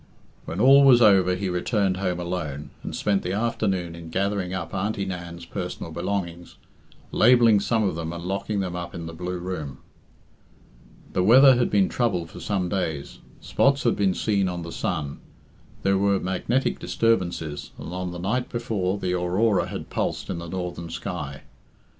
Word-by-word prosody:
When 85 Hz, -, -5 dB
all 135 Hz, +4 st, +7 dB
was 130 Hz, -3 st, +7 dB
over 95 Hz, -5 st, +5 dB
he 95 Hz, +1 st, -3 dB
returned 95 Hz, +1 st, 0 dB
home 90 Hz, -2 st, -1 dB
alone, 85 Hz, -5 st, -4 dB
and -, -, -6 dB
spent 100 Hz, -2 st, +1 dB
the 90 Hz, -, -3 dB
afternoon 100 Hz, -6 st, -1 dB
in 85 Hz, -1 st, -9 dB
gathering 100 Hz, +1 st, -1 dB
up 95 Hz, -3 st, -4 dB
Auntie 100 Hz, +1 st, -1 dB
Nan's 85 Hz, -2 st, -6 dB
personal 90 Hz, -2 st, -5 dB
belongings, 85 Hz, 0 st, -4 dB, 0.6 s
labelling 115 Hz, -3 st, +5 dB
some 110 Hz, +2 st, +1 dB
of 100 Hz, -, +1 dB
them 80 Hz, 0 st, -4 dB
and 85 Hz, 0 st, -6 dB
locking 100 Hz, +2 st, -2 dB
them 90 Hz, -2 st, -3 dB
up 85 Hz, 0 st, -6 dB
in 85 Hz, -1 st, -6 dB
the 85 Hz, -, -7 dB
blue 90 Hz, +2 st, -4 dB
room. 85 Hz, -6 st, -5 dB, 1.4 s
The 90 Hz, -, +1 dB
weather 130 Hz, +6 st, +8 dB
had 120 Hz, 0 st, +1 dB
been 100 Hz, -2 st, +3 dB
troubled 90 Hz, -9 st, -1 dB
for -, -, -10 dB
some 95 Hz, -3 st, -1 dB
days. 80 Hz, -6 st, -3 dB, 0.2 s
Spots 140 Hz, 0 st, +2 dB
had 120 Hz, -, +2 dB
been 95 Hz, -3 st, +1 dB
seen 100 Hz, -4 st, +1 dB
on 90 Hz, -1 st, -4 dB
the 85 Hz, -, -7 dB
sun. 70 Hz, -3 st, -3 dB, 0.6 s
There 95 Hz, 0 st, +3 dB
were 100 Hz, -1 st, +2 dB
magnetic 95 Hz, +8 st, -1 dB
disturbances, 90 Hz, -9 st, -1 dB
and 85 Hz, -, -7 dB
on 90 Hz, -1 st, -3 dB
the 90 Hz, -, -6 dB
night 110 Hz, +8 st, -1 dB
before 105 Hz, -5 st, -1 dB
the 90 Hz, -2 st, -2 dB
aurora 90 Hz, +4 st, +1 dB
had -, -, -7 dB
pulsed -, -, -2 dB
in -, -, -3 dB
the 85 Hz, 0 st, -7 dB
northern 90 Hz, -2 st, -5 dB
sky. 75 Hz, -5 st, -5 dB
95 Hz, 170 wpm, -25 LUFS, 85-105 Hz, 1.4 s, weather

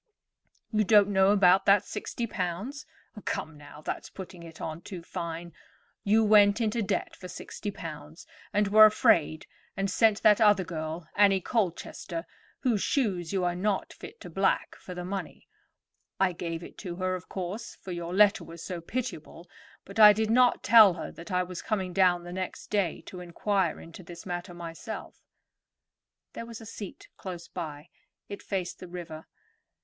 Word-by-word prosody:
"You 215 Hz, 0 st, +3 dB
don't 205 Hz, 0 st, +5 dB
know 190 Hz, -1 st, +4 dB
about 195 Hz, -2 st, +5 dB
that 200 Hz, 0 st, +6 dB
sixty 235 Hz, -, -4 dB
pounds. 205 Hz, -, -4 dB, 0.4 s
Come, 160 Hz, -, -3 dB
now, 145 Hz, 0 st, -13 dB
that's -, -, -4 dB
putting 185 Hz, -2 st, -10 dB
it 165 Hz, -1 st, -12 dB
on 160 Hz, +1 st, -5 dB
too 180 Hz, -2 st, -8 dB
fine. 170 Hz, 0 st, -6 dB, 0.5 s
You 215 Hz, +2 st, +4 dB
went 205 Hz, 0 st, +6 dB
into 225 Hz, 0 st, 0 dB
debt 200 Hz, -1 st, -2 dB
for 185 Hz, -, -10 dB
sixty 205 Hz, +3 st, -6 dB
pounds, 200 Hz, -, -9 dB, 0.3 s
and 205 Hz, 0 st, +2 dB
were 215 Hz, +1 st, +9 dB
afraid, 160 Hz, -7 st, +2 dB, 0.3 s
and 195 Hz, 0 st, -1 dB
sent 220 Hz, +1 st, +3 dB
that 210 Hz, 0 st, +6 dB
other 205 Hz, -3 st, +5 dB
girl, 160 Hz, -1 st, -5 dB
Annie 200 Hz, -1 st, +5 dB
Colchester, 175 Hz, -4 st, -3 dB, 0.4 s
whose 230 Hz, -6 st, +1 dB
shoes 190 Hz, -, 0 dB
you 190 Hz, -2 st, 0 dB
are 175 Hz, 0 st, +1 dB
not 195 Hz, +2 st, -1 dB
fit -, -, -11 dB
to 180 Hz, -, -8 dB
black, 195 Hz, +3 st, 0 dB
for 180 Hz, -, -10 dB
the 180 Hz, 0 st, -5 dB
money. 195 Hz, +1 st, -6 dB, 0.7 s
I 190 Hz, -1 st, +3 dB
gave 170 Hz, -1 st, -5 dB
it -, -, -12 dB
to 180 Hz, -4 st, -6 dB
her, 185 Hz, +1 st, -1 dB
of 185 Hz, -1 st, -6 dB
course, 195 Hz, +5 st, -5 dB
for 190 Hz, -, -9 dB
your 170 Hz, -1 st, -4 dB
letter 205 Hz, +2 st, +4 dB
was 165 Hz, 0 st, -10 dB
so 180 Hz, -3 st, -5 dB
pitiable; 180 Hz, -5 st, -5 dB, 0.4 s
but 200 Hz, +3 st, -7 dB
I 210 Hz, -1 st, +10 dB
did 220 Hz, +1 st, 0 dB
not 245 Hz, +1 st, +4 dB
tell 215 Hz, -6 st, +8 dB
her 165 Hz, -, -6 dB
that 170 Hz, +3 st, -11 dB
I 180 Hz, 0 st, +2 dB
was 180 Hz, -1 st, -7 dB
coming 190 Hz, -4 st, -2 dB
down 180 Hz, -2 st, +3 dB
the 175 Hz, 0 st, -8 dB
next 185 Hz, 0 st, -6 dB
day 200 Hz, -5 st, 0 dB
to 180 Hz, -, -10 dB
inquire 180 Hz, 0 st, -1 dB
into 165 Hz, +2 st, -11 dB
this 170 Hz, -1 st, -11 dB
matter 175 Hz, 0 st, -5 dB
myself." 170 Hz, +6 st, -8 dB, 1.1 s
There 230 Hz, -, -7 dB
was 230 Hz, -1 st, -8 dB
a 225 Hz, -, -11 dB
seat 205 Hz, -3 st, -9 dB
close 175 Hz, -3 st, -7 dB
by; 155 Hz, -2 st, -7 dB, 0.4 s
it 200 Hz, -, -7 dB
faced 185 Hz, -3 st, -4 dB
the 185 Hz, -, -9 dB
river. 170 Hz, -3 st, -8 dB
185 Hz, 175 wpm, -28 LUFS, 175-210 Hz, 1.1 s, I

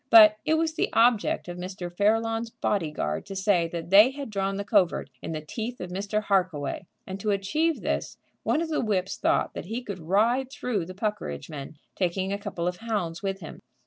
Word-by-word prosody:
But 215 Hz, -2 st, +9 dB
it 315 Hz, -, +3 dB
was 320 Hz, 0 st, +1 dB
the 320 Hz, -, 0 dB
object 230 Hz, -4 st, +3 dB
of 175 Hz, 0 st, -6 dB
Mr. 180 Hz, -1 st, -6 dB
Fairlawn's 225 Hz, +3 st, +1 dB
body 195 Hz, -7 st, -1 dB
guard 75 Hz, -, -2 dB
to 195 Hz, -, -6 dB
say 190 Hz, -3 st, +2 dB
that 170 Hz, +1 st, -6 dB
they 210 Hz, +5 st, +9 dB
had 275 Hz, -3 st, -7 dB
drawn 195 Hz, -1 st, -1 dB
the 200 Hz, -, -2 dB
covert 190 Hz, -, +2 dB
in -, -, -5 dB
the 155 Hz, -1 st, -3 dB
teeth 235 Hz, +8 st, -5 dB
of 180 Hz, -, -6 dB
Mr. 205 Hz, +3 st, -1 dB
Harkaway, 185 Hz, -5 st, 0 dB, 0.2 s
and 190 Hz, +1 st, -6 dB
to 210 Hz, -, -2 dB
achieve 300 Hz, +12 st, +1 dB
this -, -, -2 dB, 0.2 s
one 320 Hz, -, +1 dB
of 330 Hz, -, -4 dB
the 310 Hz, -, 0 dB
whips 195 Hz, -4 st, -1 dB
thought -, -, +1 dB
that -, -, -6 dB
he 225 Hz, +6 st, -4 dB
could 200 Hz, -5 st, -6 dB
ride 225 Hz, +10 st, +2 dB
through 220 Hz, -10 st, -2 dB
the 185 Hz, -, -8 dB
Puckeridge 195 Hz, -, -3 dB
men, 145 Hz, +1 st, -7 dB, 0.2 s
taking 190 Hz, +1 st, 0 dB
a 200 Hz, -, -2 dB
couple 175 Hz, -3 st, -3 dB
of 180 Hz, 0 st, -2 dB
hounds 205 Hz, -8 st, -2 dB
with 195 Hz, -1 st, -3 dB
him. 160 Hz, -, -9 dB
200 Hz, 210 wpm, -27 LUFS, 180-225 Hz, 0.2 s, But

